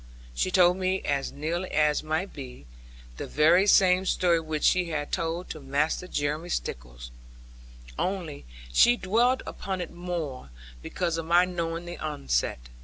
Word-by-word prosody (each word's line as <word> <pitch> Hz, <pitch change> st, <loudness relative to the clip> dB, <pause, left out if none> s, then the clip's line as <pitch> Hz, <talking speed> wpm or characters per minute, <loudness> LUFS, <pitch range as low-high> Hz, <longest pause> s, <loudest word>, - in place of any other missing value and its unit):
She 125 Hz, -, 0 dB
told 180 Hz, -1 st, +4 dB
me 190 Hz, 0 st, 0 dB
(as 140 Hz, -1 st, -1 dB
nearly 170 Hz, +5 st, -3 dB
as 150 Hz, -1 st, +2 dB
might 160 Hz, +5 st, -2 dB
be) 125 Hz, -, -9 dB, 0.5 s
the -, -, -5 dB
very 170 Hz, +6 st, +4 dB
same 185 Hz, -1 st, +5 dB
story 175 Hz, -2 st, +2 dB
which 155 Hz, -1 st, -4 dB
she 180 Hz, -1 st, +4 dB
had 145 Hz, -2 st, -3 dB
told 165 Hz, +2 st, -2 dB
to 155 Hz, -, -7 dB
Master 145 Hz, +5 st, -1 dB
Jeremy 150 Hz, +2 st, -2 dB
Stickles; -, -, -5 dB, 0.9 s
only 180 Hz, -, -3 dB, 0.3 s
she 240 Hz, -, +6 dB
dwelled 235 Hz, +7 st, +2 dB
upon 190 Hz, -1 st, -5 dB
it 175 Hz, -, -5 dB
more, 170 Hz, -, -5 dB, 0.3 s
because 170 Hz, -, -2 dB
of 160 Hz, -, -6 dB
my 175 Hz, +2 st, +5 dB
knowing 170 Hz, -1 st, -3 dB
the 175 Hz, 0 st, -7 dB
outset. 65 Hz, -, -1 dB
165 Hz, 150 wpm, -27 LUFS, 150-180 Hz, 0.9 s, she